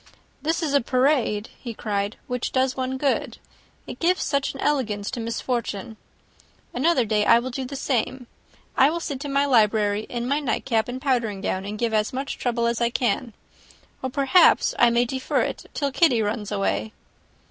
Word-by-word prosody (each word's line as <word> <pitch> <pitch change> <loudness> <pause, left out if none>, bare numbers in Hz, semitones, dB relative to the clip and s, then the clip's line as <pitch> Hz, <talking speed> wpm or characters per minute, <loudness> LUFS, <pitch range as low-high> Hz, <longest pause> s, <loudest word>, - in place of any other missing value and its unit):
"This 325 +2 -1
is 295 -3 -1
a 280 - +4
parade," 250 -4 +1 0.3
cried 205 -1 -2
he, - - -32
"which 250 -1 -3
does 260 0 +1
one 260 0 -2
good; 275 0 -1 0.5
it - - -8
gives 360 +2 +2
such 280 -1 -1
an - - -9
elegance 220 -10 -1
to - - -4
misfortune! 230 -2 -3 0.8
Another 265 -1 +2
day 210 -1 +1
I 230 - +6
will 250 +2 -3
do 260 +1 -4
the 275 +2 -7
same; 255 -1 -1 0.5
I 270 +1 +5
will 335 +2 -2
sit 285 -4 -5
in 285 - -4
my 280 +1 +2
library, 215 -4 +2
in 240 0 -3
my 285 +3 +1
nightcap 235 -5 0
and 250 +1 -5
powdering 235 -7 0
gown, 190 -1 -2
and 210 +1 -5
give 230 0 -1
as 215 +2 +1
much 270 +2 -4
trouble 235 -1 0
as 235 0 0
I 235 - +3
can, 240 -1 -1 0.7
or 260 - -2
perhaps 280 +7 +4
I 240 - +6
may 235 +1 +2
defer 260 +2 -1
it - - -4
till 280 -2 -1
Kitty 260 -6 +3
runs 210 0 -3
away." 205 +2 -1
245 Hz, 185 wpm, -24 LUFS, 220-275 Hz, 0.8 s, I